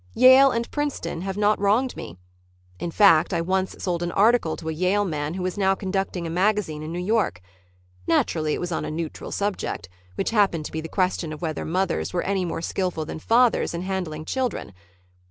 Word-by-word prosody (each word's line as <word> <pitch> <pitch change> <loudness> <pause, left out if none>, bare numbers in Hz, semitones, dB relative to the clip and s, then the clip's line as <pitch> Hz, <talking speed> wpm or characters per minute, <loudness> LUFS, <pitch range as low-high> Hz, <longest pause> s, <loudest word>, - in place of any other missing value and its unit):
Yale 260 +2 +8
and 235 -2 -2
Princeton 290 - -3
have 195 +1 -4
not 210 0 +2
wronged 215 +6 +2
me. 85 - -8 0.6
In - - -3
fact, 175 -2 +5
I 170 - +1
once 185 +2 -1
sold 175 -2 -2
an 175 0 -2
article 215 -5 +3
to 160 - -8
a - - 0
Yale 185 +5 +1
man 155 -2 -3
who 185 -1 -3
is 185 +2 -3
now 195 -1 +3
conducting 190 -2 -2
a - - -3
magazine 185 -4 0
in 155 +1 -6
New 170 - -4
York. 195 - 0 0.7
Naturally 155 -2 +1
it - - -5
was 175 0 -4
on 160 - -2
a - - -4
neutral 155 0 -5
subject, 200 - -3 0.3
which - - -1
happened 195 -8 +2
to - - -6
be 160 - -3
the 160 - -7
question 180 -3 0
of 155 +2 -8
whether 160 -2 -3
mothers 185 +3 -1
were 175 - 0
any 195 -2 0
more 165 -1 -4
skillful 180 -3 -2
than 160 - -6
fathers 235 -1 +3
in 170 - -3
handling 180 -5 -4
children. 250 - -2
185 Hz, 205 wpm, -24 LUFS, 165-205 Hz, 0.7 s, Yale